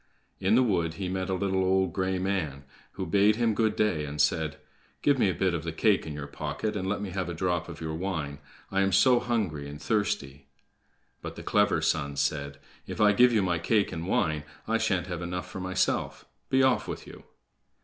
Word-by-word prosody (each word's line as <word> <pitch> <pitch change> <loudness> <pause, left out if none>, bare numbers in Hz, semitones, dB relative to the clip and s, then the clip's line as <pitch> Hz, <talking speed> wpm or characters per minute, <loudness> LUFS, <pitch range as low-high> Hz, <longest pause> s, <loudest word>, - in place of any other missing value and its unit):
In 100 +3 +3
the 130 - +5
wood 85 -8 0
he 95 -2 -3
met 95 0 -2
a 95 - +1
little, 95 0 0
old, 95 0 +2
gray 95 0 0
man, 90 -8 -2 0.3
who - - -4
bade 100 +5 +4
him 115 -1 +2
good 110 0 +1
day, 95 -8 +1
and 75 0 -6
said: 80 -1 +1 0.5
"Give 145 -2 +3
me 100 - +4
a 95 - -1
bit 95 -2 +1
of 85 -3 -2
the 80 - -3
cake 95 +2 +2
in 75 - -5
your 75 -1 -5
pocket, 105 +8 -4
and 95 -2 -2
let 105 - -1
me 100 - -5
have 95 -1 -3
a 85 - -4
drop 85 -1 -1
of 80 -1 -8
your 80 -1 -3
wine. 80 -5 -3 0.3
I 95 0 +2
am 95 0 +1
so 125 -2 +5
hungry 100 -13 -2
and 75 0 -8
thirsty." 75 -7 -2 0.7
But - - -7
the - - -8
clever - - +2
son 70 -2 0
said: 70 0 -1 0.3
"If - - -6
I 105 -1 +6
give 125 +4 +6
you 110 -4 +2
my 85 -2 0
cake 105 +4 +1
and 85 0 -5
wine, 75 -5 +1 0.2
I 115 0 +1
shan't 100 -6 +1
have 90 -2 -5
enough 90 +1 -4
for - - -7
myself. 95 0 -1 0.2
Be 130 0 +4
off 130 -1 +2
with - - -6
you!" - - -13
95 Hz, 220 wpm, -28 LUFS, 80-105 Hz, 0.7 s, I